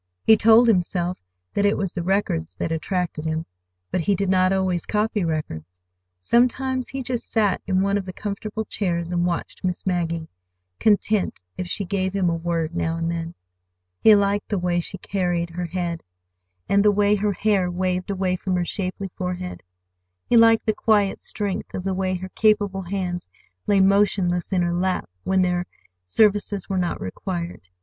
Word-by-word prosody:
He 220 - +7
told 225 +3 +6
himself 180 -3 +1 0.3
that 200 - +1
it 205 0 +3
was 195 -3 -2
the 175 - -3
records 170 - -1
that 160 - -3
attracted 165 0 -2
him. 160 0 -2 0.5
But 180 - 0
he 200 +4 +2
did 195 0 -1
not 185 0 +3
always 185 -3 0
copy 210 -1 0
records. 90 - -4 0.4
Sometimes 255 - +1
he 270 -1 -4
just 245 -1 -4
sat 210 -4 +1
in 190 -1 +2
one 200 +1 +2
of 195 - -6
the - - -4
comfortable 210 +3 -4
chairs 170 -5 -2
and 175 0 +1
watched 170 -1 -4
Miss 180 -1 -2
Maggie, 170 -3 -1 0.5
content 210 -1 +2 0.2
if 180 - -4
she 200 +3 -3
gave 190 0 -1
him 185 -3 +2
a - - 0
word 165 -1 -2
now 165 -1 0
and 165 0 -1
then. 165 0 -4 0.6
He 220 - +7
liked 200 0 +1
the 205 - 0
way 175 -1 0
she 180 +2 -4
carried 175 -3 -1
her 175 +1 -4
head, 170 -1 -3 0.7
and 200 0 +3
the 210 - +6
way 205 0 +3
her 205 0 +1
hair 195 -2 +1
waved 180 +1 -1
away 185 -2 0
from 185 0 -2
her 175 -1 0
shapely 190 0 -3
forehead. 180 0 -4 0.6
He - - +2
liked 225 -1 +6
the 220 - +2
quiet 210 -3 +2
strength 205 -3 -4
of 185 - -4
the 190 0 -1
way 185 0 -1
her 185 +1 -6
capable 205 -2 +2
hands 180 - -4 0.4
lay 200 -1 +4
motionless 190 -2 +2
in 180 -2 +2
her 175 0 0
lap 185 +1 0 0.2
when 190 -1 +3
their 180 0 0 0.4
services 205 - +2
were 190 -1 -1
not 175 -1 -1
required. 170 - -5
185 Hz, 180 wpm, -23 LUFS, 175-205 Hz, 0.7 s, He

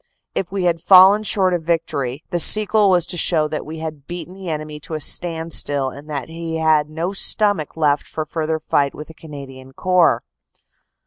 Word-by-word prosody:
If 185 - -3
we 195 -1 -3
had 170 -2 0
fallen 190 +3 +6
short 190 -3 0
of 175 - -1
victory, 150 -5 -3
the 175 - -1
sequel 210 +2 +5
was 180 -3 +3
to 175 - -3
show 155 -2 +2
that 155 - -5
we 160 +1 -7
had 155 -3 -8
beaten 175 +1 -8
the 190 -2 -8
enemy 155 -1 -6
to 155 +2 -7
a - - -4
standstill 160 -4 0
and 145 +3 -13
that 140 -4 -5
he 165 0 -6
had 155 -2 +1
no 165 +5 -4
stomach 200 -6 +1
left 145 -2 0
for 155 - -5
further 160 0 -3
fight 140 -2 -1
with 150 - -10
the - - -11
Canadian 135 -4 -12
Corps. 180 +2 +2
160 Hz, 190 wpm, -19 LUFS, 150-180 Hz, -, fallen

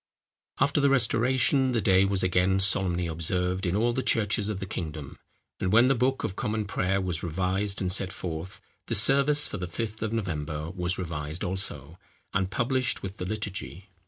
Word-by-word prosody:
After 145 +1 +2
the 140 - +4
restoration, 130 +1 +3
the 115 - +1
day 95 -3 +4
was 95 -1 +1
again 95 +1 +2
solemnly 95 -2 +3
observed 90 +3 -1
in 85 - 0
all 120 +3 +1
the 130 - -1
churches 110 -3 +1
of 105 -3 -3
the 95 - -4
kingdom; 80 -6 -6 0.4
and 95 - -1
when 120 +4 +5
the - - +5
Book 130 +2 0
of 95 - -3
Common 105 0 -2
Prayer 95 0 0
was 90 -4 -2
revised 95 +4 -1
and 90 -1 0
set 95 0 +2
forth, 85 0 -6 0.3
the - - -1
service 140 +6 +4
for - - -5
the 90 - -4
Fifth 110 +4 -5
of 110 -1 -2
November 80 -7 -3
was 90 -1 +1
revised 80 -2 -5
also, 90 -4 -3 0.3
and 95 -1 0
published 130 +4 0
with 95 +1 -6
the 90 - -5
Liturgy. 100 -2 -5
95 Hz, 185 wpm, -27 LUFS, 90-115 Hz, 0.4 s, when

